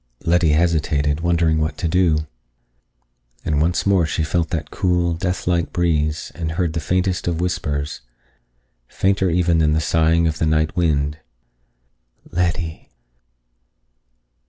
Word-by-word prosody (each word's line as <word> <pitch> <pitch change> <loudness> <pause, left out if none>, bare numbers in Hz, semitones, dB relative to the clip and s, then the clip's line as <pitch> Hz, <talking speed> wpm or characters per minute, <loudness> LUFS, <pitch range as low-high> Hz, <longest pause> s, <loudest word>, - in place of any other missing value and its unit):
Letty 85 -2 +3
hesitated, 75 -3 +1
wondering 85 -2 +2
what 80 +1 -2
to 85 - -1
do. 80 -3 +2 1.2
And 75 -1 +1
once 85 +3 +1
more 95 -5 +3
she 80 - -1
felt 80 0 -1
that 80 -3 -4
cool, 90 -2 +1
death 90 +2 -3
like 85 -2 0
breeze, 75 -4 0
and 80 -2 -4
heard 85 -2 -1
the 85 - -1
faintest 90 +3 -1
of 85 -2 -1
whispers, 75 -6 -2 0.9
fainter 95 +3 +1
even 85 -1 +2
than 75 -1 +3
the 80 - +2
sighing 80 +3 +2
of 80 -1 -1
the 80 - +1
night 80 0 +1
wind: 75 -3 0 1.1
"Letty." 85 -2 -2
80 Hz, 135 wpm, -20 LUFS, 80-90 Hz, 1.2 s, Letty